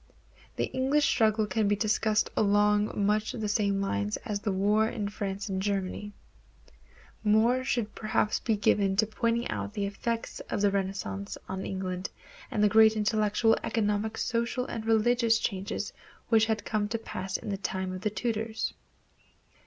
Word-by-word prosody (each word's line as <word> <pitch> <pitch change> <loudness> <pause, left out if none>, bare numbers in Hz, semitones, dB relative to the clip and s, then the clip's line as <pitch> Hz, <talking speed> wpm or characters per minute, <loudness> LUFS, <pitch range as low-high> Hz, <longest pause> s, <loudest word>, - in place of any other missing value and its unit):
The - - -1
English 270 +3 +2
struggle 215 -1 +3
can 210 +1 0
be 205 - +3
discussed 215 0 +1
along 205 0 +2
much 210 +1 +1
the 220 -3 -3
same 205 -1 +1
lines 100 - -1
as 205 -1 -2
the 210 0 -2
wars 210 +3 +2
in 205 -2 -2
France 200 -1 -4
and 190 -2 -2
Germany. 200 +1 -2 1.1
More 220 +4 +4
time 255 - -3
should 235 -5 -1
perhaps 215 -1 0
be 225 - 0
given 200 -1 +2
to 215 +2 +3
pointing 230 +2 0
out 205 - -4
the 205 -1 -1
effects 230 +3 -3
of - - -1
the 205 -1 +4
Renaissance 190 - -3
on 190 0 -4
England 185 -1 -3 0.4
and 210 - 0
the - - +7
great 220 +1 +6
intellectual, 215 +1 +2
economic, 215 0 0
social, 245 +1 -1
and 225 -3 -5
religious 225 +1 +3
changes 195 -3 -3 0.4
which 225 -1 +4
had 220 -2 -1
come 210 -1 0
to 230 +2 -2
pass 190 -4 -4
in - - -7
the 200 - -1
time 190 -1 -3
of 185 - -6
the 210 - 0
Tudors. 220 0 -2
210 Hz, 165 wpm, -29 LUFS, 200-225 Hz, 1.1 s, the